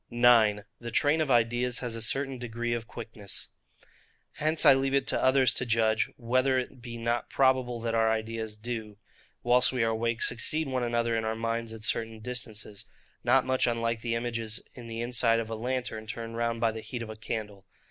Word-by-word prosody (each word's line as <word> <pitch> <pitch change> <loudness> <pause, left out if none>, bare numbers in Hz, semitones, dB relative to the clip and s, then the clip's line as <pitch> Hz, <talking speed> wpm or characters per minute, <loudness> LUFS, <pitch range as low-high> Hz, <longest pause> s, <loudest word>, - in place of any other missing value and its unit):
9. 115 -4 +5 0.2
The 120 - -6
Train 145 +6 +2
of 155 - 0
Ideas 120 +1 +2
has 125 -4 -3
a 115 - -5
certain 135 +3 0
Degree 120 0 -3
of 115 -1 -4
Quickness. 110 -4 -7 0.9
Hence 155 +2 +2
I 140 - +10
leave 135 +1 +1
it 135 -1 +2
to - - 0
others 130 -1 +4
to - - +3
judge, 110 -2 +2
whether 130 +2 +2
it 130 0 -4
be 120 -1 -7
not 115 0 -1
probable 130 -3 +2
that 115 0 -2
our 115 -1 +3
ideas 110 -1 -2
do, 110 -2 -5 0.5
whilst 125 +1 +4
we 125 -3 0
are 115 - +2
awake, 115 +1 0
succeed 150 +6 +1
one 130 -1 -1
another 120 -1 0
in 110 - 0
our 110 0 -1
minds 115 0 -2
at 110 -1 -8
certain 110 0 +1
distances; 110 -3 -5 0.4
not - - +4
much 130 0 +1
unlike 115 -1 -1
the 115 0 -1
images 115 -1 -3
in 120 -2 -10
the 115 0 -5
inside 120 -1 +2
of 115 0 -4
a - - -2
lantern, 120 -2 -3
turned 115 +1 -6
round 115 0 -1
by 115 -1 +2
the 110 0 -7
heat 120 +1 -5
of 110 - -8
a - - -8
candle. 105 -2 -5
115 Hz, 200 wpm, -29 LUFS, 115-125 Hz, 0.9 s, I